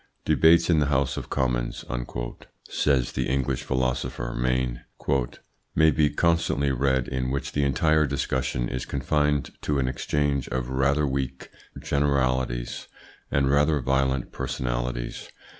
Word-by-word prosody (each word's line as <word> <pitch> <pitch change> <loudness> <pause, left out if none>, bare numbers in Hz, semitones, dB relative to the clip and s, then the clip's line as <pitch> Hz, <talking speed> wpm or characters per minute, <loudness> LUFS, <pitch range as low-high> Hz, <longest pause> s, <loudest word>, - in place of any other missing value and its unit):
"Debates 85 +1 +5
in 80 -3 +4
the 75 - +2
House 70 -2 +1
of - - -6
Commons," 65 -3 -1 0.8
says 65 -4 +1
the - - -1
English 65 -1 0
philosopher 65 -1 -2
Maine, 60 -1 0 0.9
"may 80 0 +5
be 75 +1 +3
constantly 85 -5 +1
read 65 -1 +1
in 65 -1 -2
which 70 +1 -2
the 70 - 0
entire 75 +2 +3
discussion 65 -3 -1
is 65 +1 -3
confined 75 +1 0
to 75 - 0
an 65 -2 +1
exchange 70 +1 -1
of 65 0 -2
rather 70 +3 +2
weak 65 -1 -3 0.3
generalities 65 -4 0 0.4
and 70 -1 +2
rather 75 +1 +3
violent 65 0 0
personalities. - - -3
65 Hz, 125 wpm, -26 LUFS, 65-70 Hz, 0.9 s, Debates